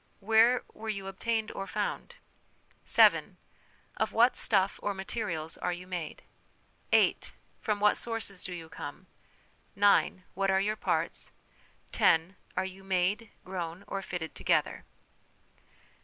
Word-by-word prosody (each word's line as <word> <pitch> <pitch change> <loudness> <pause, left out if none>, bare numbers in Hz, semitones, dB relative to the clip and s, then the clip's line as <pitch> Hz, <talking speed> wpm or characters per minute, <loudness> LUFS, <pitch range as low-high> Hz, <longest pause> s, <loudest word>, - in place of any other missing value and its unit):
Where 225 +4 +4
were 220 0 -7
you 200 -3 -3
obtained 220 +3 -2
or 195 - -5
found? - - -3 0.4
" - - -36 0.2
7. - - +5 0.6
Of 220 - 0
what 240 +3 +4
stuff 195 -2 +2
or 205 -1 -2
materials 190 -5 -4
are 180 - -1
you 175 +1 -6
made? 175 -4 -5 0.4
" - - -37
8. - - +3 0.3
From 210 -1 -1
what 210 0 +4
sources 225 -5 -3
do 185 - -4
you 170 -2 -7
come? 145 +2 -8 0.4
" - - -36
9. 200 -2 +3
What 195 +1 0
are 190 0 +4
your 210 +2 0
parts? - - -2 0.3
" - - -30 0.3
10. 165 +4 +3 0.2
Are 185 - +1
you 190 +1 -9
made, 195 +4 0 0.2
grown, 180 0 -5
or 195 - -4
fitted 175 -4 -5
together? - - 0
195 Hz, 145 wpm, -30 LUFS, 180-215 Hz, 0.6 s, 7